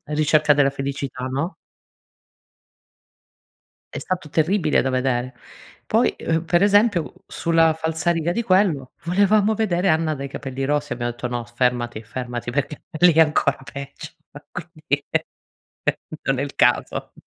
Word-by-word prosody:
ricerca 150 Hz, 0 st, +3 dB
della 140 Hz, -1 st, +3 dB
felicità, 135 Hz, -1 st, -4 dB
no 140 Hz, +8 st, -2 dB, 2.4 s
è -, -, -5 dB
stato 180 Hz, -5 st, -4 dB
terribile 160 Hz, 0 st, +2 dB
da 130 Hz, -, -1 dB
vedere. 130 Hz, -1 st, 0 dB, 0.5 s
Poi, -, -, +2 dB
uhm, 165 Hz, 0 st, -1 dB
per 175 Hz, +2 st, +2 dB
esempio 205 Hz, -4 st, +3 dB
sulla 165 Hz, -1 st, +2 dB
falsariga 160 Hz, +1 st, 0 dB
di 235 Hz, +5 st, -1 dB
quello 185 Hz, -, +2 dB
volevamo 205 Hz, +4 st, +3 dB
vedere 190 Hz, -4 st, +1 dB
Anna 160 Hz, 0 st, +2 dB
dai 140 Hz, -1 st, -5 dB
capelli 135 Hz, 0 st, -5 dB
rossi 145 Hz, -1 st, 0 dB
abbiamo 120 Hz, 0 st, -2 dB
detto: 120 Hz, +1 st, -5 dB
"No, 120 Hz, -1 st, -3 dB
fermati, 120 Hz, -1 st, -1 dB
fermati! 120 Hz, +2 st, -5 dB
Perché 145 Hz, +3 st, -3 dB, 0.2 s
lì 175 Hz, -1 st, +6 dB
è 160 Hz, -, +6 dB
ancora 150 Hz, -2 st, +2 dB
peggio, 140 Hz, +3 st, -8 dB, 0.4 s
quindi 155 Hz, -4 st, -3 dB, 1.2 s
non 135 Hz, -1 st, 0 dB
è 140 Hz, -, 0 dB
il 140 Hz, -, -6 dB
caso." 120 Hz, 0 st, +1 dB
150 Hz, 130 wpm, -22 LUFS, 130-170 Hz, 2.4 s, lì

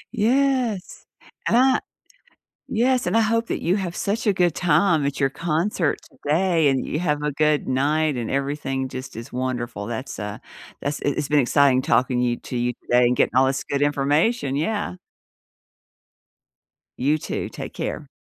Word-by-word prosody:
Yes, 245 Hz, -3 st, 0 dB, 0.4 s
and 235 Hz, -, +3 dB
I 260 Hz, +1 st, +4 dB, 0.9 s
Yes, 245 Hz, -1 st, +2 dB
and 200 Hz, +6 st, +2 dB
I -, -, +5 dB
hope 230 Hz, +1 st, +1 dB
that -, -, -3 dB
you 180 Hz, +4 st, +2 dB
have 180 Hz, -3 st, -4 dB
such 215 Hz, +2 st, -2 dB
a 205 Hz, -, +4 dB
good 175 Hz, -4 st, +2 dB
time 175 Hz, -3 st, +2 dB
at 140 Hz, 0 st, -2 dB
your 135 Hz, -1 st, +2 dB
concert 165 Hz, 0 st, 0 dB
today, 165 Hz, 0 st, +1 dB
and 135 Hz, -1 st, 0 dB
you 150 Hz, -, -2 dB
have 150 Hz, -4 st, 0 dB
a 150 Hz, -, 0 dB
good 150 Hz, +1 st, +1 dB
night, 145 Hz, +3 st, +1 dB
and 115 Hz, -, -3 dB
everything 135 Hz, -1 st, -2 dB
just 130 Hz, -1 st, -7 dB
is 115 Hz, +1 st, -8 dB
wonderful, 120 Hz, -4 st, -3 dB
that's, 120 Hz, +3 st, -5 dB
uh, 105 Hz, +1 st, -5 dB, 0.4 s
that's 145 Hz, +1 st, -2 dB
it 145 Hz, -, 0 dB
it's 150 Hz, -1 st, -2 dB
been 150 Hz, -, +4 dB
exciting 135 Hz, 0 st, +4 dB
talking 130 Hz, -4 st, +2 dB
you 120 Hz, -1 st, +1 dB
to 125 Hz, -, -5 dB
you 120 Hz, 0 st, 0 dB
today 125 Hz, 0 st, +3 dB
and 125 Hz, +1 st, +2 dB
getting -, -, +2 dB
all 130 Hz, +1 st, +5 dB
this 135 Hz, 0 st, -1 dB
good 140 Hz, 0 st, -2 dB
information 145 Hz, -, +1 dB
yeah. 205 Hz, +3 st, -2 dB, 2.0 s
You 145 Hz, +4 st, +2 dB
too, -, -, -4 dB
take -, -, -8 dB
care. -, -, -4 dB
150 Hz, 170 wpm, -23 LUFS, 130-185 Hz, 2.0 s, I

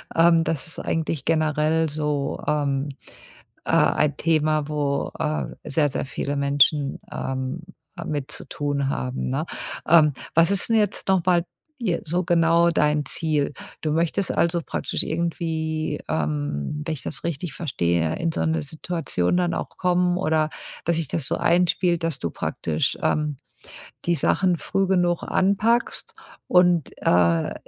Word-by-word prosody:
Ähm, 165 Hz, 0 st, +5 dB
das 165 Hz, -3 st, -1 dB
ist 160 Hz, -, -5 dB
eigentlich 160 Hz, -3 st, -2 dB
generell 155 Hz, 0 st, +2 dB
so, 150 Hz, -2 st, -1 dB
ähm, 145 Hz, -1 st, 0 dB, 0.8 s
äh, -, -, -4 dB
ein 150 Hz, -1 st, +3 dB
Thema, 155 Hz, -2 st, +1 dB
wo, 145 Hz, -2 st, -1 dB
äh, 155 Hz, 0 st, -1 dB, 0.2 s
sehr, 150 Hz, 0 st, +1 dB
sehr 140 Hz, -, -3 dB
viele 140 Hz, +1 st, -3 dB
Menschen, 140 Hz, 0 st, +2 dB
ähm, 130 Hz, +4 st, -3 dB, 0.4 s
äh, 170 Hz, -, -6 dB
mit 145 Hz, -2 st, -3 dB
zu -, -, -3 dB
tun 145 Hz, -1 st, -1 dB
haben, 125 Hz, -2 st, -2 dB
ne? 135 Hz, +5 st, -1 dB, 0.4 s
Ähm, 155 Hz, -2 st, +6 dB, 0.2 s
was 165 Hz, +2 st, +5 dB
ist 200 Hz, +2 st, +3 dB
'n 225 Hz, -, +4 dB
jetzt 210 Hz, -2 st, 0 dB
noch 190 Hz, -3 st, +3 dB
mal 175 Hz, -2 st, +3 dB, 0.4 s
je 180 Hz, -7 st, +1 dB
so 175 Hz, +3 st, 0 dB
genau 170 Hz, -1 st, +4 dB
dein 150 Hz, -3 st, +1 dB
Ziel? 150 Hz, -2 st, +1 dB, 0.3 s
Du 155 Hz, -, -1 dB
möchtest 170 Hz, +4 st, 0 dB
also 170 Hz, 0 st, +2 dB
praktisch -, -, -3 dB
irgendwie, 160 Hz, -2 st, -2 dB
ähm, 150 Hz, -, -2 dB
wenn 160 Hz, -, -2 dB
ich 145 Hz, -6 st, -5 dB
das -, -, -6 dB
richtig 165 Hz, -1 st, -3 dB
verstehe, 85 Hz, -, 0 dB
in 165 Hz, 0 st, -1 dB
so -, -, -1 dB
'ne 160 Hz, 0 st, +1 dB
Situation 160 Hz, -, -1 dB
dann 175 Hz, -1 st, +1 dB
auch -, -, -4 dB
kommen 180 Hz, -1 st, +2 dB
oder 155 Hz, -3 st, +1 dB, 0.3 s
dass 170 Hz, 0 st, +1 dB
sich 165 Hz, -4 st, -1 dB
das 150 Hz, -2 st, -1 dB
so -, -, 0 dB
einspielt, 175 Hz, 0 st, +2 dB
dass 165 Hz, -4 st, -1 dB
du 85 Hz, -, -3 dB
praktisch, 80 Hz, -1 st, -2 dB
ähm, 150 Hz, -1 st, 0 dB, 0.7 s
die 170 Hz, -, +2 dB
Sachen 180 Hz, +4 st, +2 dB
früh 195 Hz, +4 st, 0 dB
genug 175 Hz, -2 st, +1 dB
anpackst 205 Hz, +5 st, +1 dB, 0.3 s
und, 175 Hz, -4 st, +4 dB
äh, 85 Hz, -2 st, +2 dB
160 Hz, 150 wpm, -24 LUFS, 145-170 Hz, 0.8 s, Ähm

